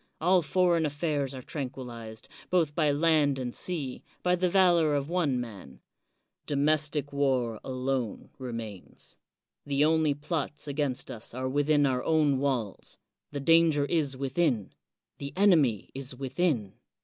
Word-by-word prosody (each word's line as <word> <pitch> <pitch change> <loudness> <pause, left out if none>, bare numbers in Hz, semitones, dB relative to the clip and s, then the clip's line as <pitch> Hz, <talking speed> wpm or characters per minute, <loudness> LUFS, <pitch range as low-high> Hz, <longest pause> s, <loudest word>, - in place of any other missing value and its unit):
All 180 +3 +4
foreign 175 0 +2
affairs 145 -2 -1
are 130 - -8
tranquilized, 125 -6 -7 0.2
both 165 -5 +2
by 155 -1 +2
land 145 -2 +3
and 125 -2 -4
sea, 150 -8 -4 0.2
by 180 0 +3
the 180 0 +1
valor 175 -5 +4
of 140 +3 -2
one 155 -8 +1
man. 105 - -8 0.7
Domestic 145 0 +1
war 130 -5 0
alone 130 -3 -3
remains. 115 -6 -8 0.5
The 145 +1 +2
only 155 -2 +2
plots 150 0 -4
against 140 -2 -2
us 115 +1 -8
are 130 0 -2
within 145 +2 +2
our 130 -2 0
own 150 -4 +2
walls, 130 -7 -2 0.2
— - - -59
^the 140 -1 -5
danger 165 -3 +5
is 145 -4 0
within, 135 - 0 0.2
— - - -52
^the 140 0 -6
enemy 160 - +3
is 135 -1 -4
within. 135 - -1
140 Hz, 140 wpm, -28 LUFS, 130-160 Hz, 0.7 s, danger